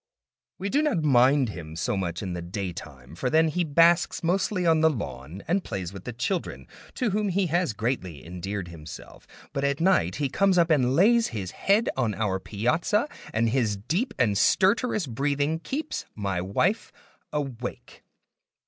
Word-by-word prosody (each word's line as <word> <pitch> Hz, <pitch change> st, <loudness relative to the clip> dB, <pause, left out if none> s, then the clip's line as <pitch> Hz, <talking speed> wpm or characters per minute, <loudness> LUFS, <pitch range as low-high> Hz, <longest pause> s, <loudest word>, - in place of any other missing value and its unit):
We 195 Hz, -, -3 dB
do 285 Hz, +6 st, +2 dB
not 240 Hz, -, +1 dB
mind 135 Hz, -1 st, +4 dB
him 80 Hz, -5 st, -8 dB
so 110 Hz, +7 st, -1 dB
much 85 Hz, -2 st, -3 dB
in 95 Hz, -2 st, -3 dB
the 90 Hz, -, -4 dB
daytime, 85 Hz, -8 st, -7 dB
for 85 Hz, -, -3 dB
he 160 Hz, +5 st, +2 dB
then 150 Hz, -4 st, -7 dB
basks 170 Hz, +1 st, +4 dB
mostly 180 Hz, +2 st, 0 dB
on 160 Hz, -1 st, +4 dB
the 160 Hz, -, +6 dB
lawn 90 Hz, -, -6 dB
and 180 Hz, +4 st, +1 dB
plays 95 Hz, -1 st, -5 dB
with 95 Hz, -1 st, -10 dB
the 125 Hz, -, -4 dB
children 125 Hz, -, -3 dB, 0.3 s
(to 245 Hz, -5 st, 0 dB
whom 210 Hz, +1 st, 0 dB
he 190 Hz, +1 st, +1 dB
has 175 Hz, -8 st, +1 dB
greatly 100 Hz, -, -3 dB
endeared 90 Hz, +2 st, -5 dB
himself), 80 Hz, -2 st, -11 dB, 0.3 s
but 140 Hz, -, -2 dB
at 140 Hz, 0 st, 0 dB
night 165 Hz, -, +2 dB
he 145 Hz, -1 st, 0 dB
comes 190 Hz, +7 st, +2 dB
up 170 Hz, -1 st, +4 dB
and 130 Hz, -4 st, +3 dB
lays 225 Hz, +7 st, +5 dB
his 100 Hz, -6 st, -5 dB
head 205 Hz, +4 st, +2 dB
on 115 Hz, -6 st, 0 dB
our 95 Hz, -3 st, -1 dB
piazza, 160 Hz, -, 0 dB, 0.2 s
and 115 Hz, 0 st, +1 dB
his 110 Hz, -4 st, +1 dB
deep 180 Hz, -, -2 dB
and 105 Hz, -6 st, +2 dB
stertorous 205 Hz, -, +3 dB
breathing 145 Hz, +5 st, -1 dB
keeps 285 Hz, -, -4 dB
my 100 Hz, -4 st, -2 dB
wife 140 Hz, -, 0 dB, 0.4 s
awake. 130 Hz, -5 st, -5 dB
130 Hz, 170 wpm, -26 LUFS, -, 0.4 s, the